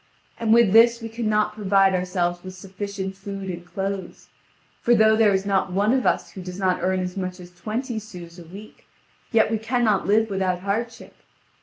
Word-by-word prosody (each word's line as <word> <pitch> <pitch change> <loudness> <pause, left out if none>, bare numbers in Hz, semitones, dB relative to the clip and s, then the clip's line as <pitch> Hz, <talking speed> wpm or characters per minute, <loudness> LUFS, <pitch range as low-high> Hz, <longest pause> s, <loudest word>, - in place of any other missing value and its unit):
And 225 -1 0
with 230 -4 +5
this 235 +1 +6
we 225 -1 -7
cannot 215 -2 0
provide 195 -2 +3
ourselves 180 -1 -1
with 185 0 -9
sufficient 195 +1 -6
food 195 -1 -6
and 175 0 -7
clothes. 195 0 -5 0.5
For 240 - +4
though 220 0 +5
there 220 -2 +4
is 190 0 0
not 195 -2 0
one 205 +5 +2
of 260 -1 +1
us - - 0
who 190 - -9
does 180 0 -8
not 185 -2 0
earn 185 +1 0
as 180 0 -4
much 185 -1 -4
as 175 0 -12
twenty 220 +6 -4
sous 175 -5 -11
a - - -10
week, 195 +6 -13 0.4
yet 225 -2 +3
we 220 - 0
cannot 220 -4 0
live 220 +1 +2
without 185 -2 -1
hardship. 225 +4 -4
195 Hz, 190 wpm, -23 LUFS, 185-220 Hz, 0.5 s, this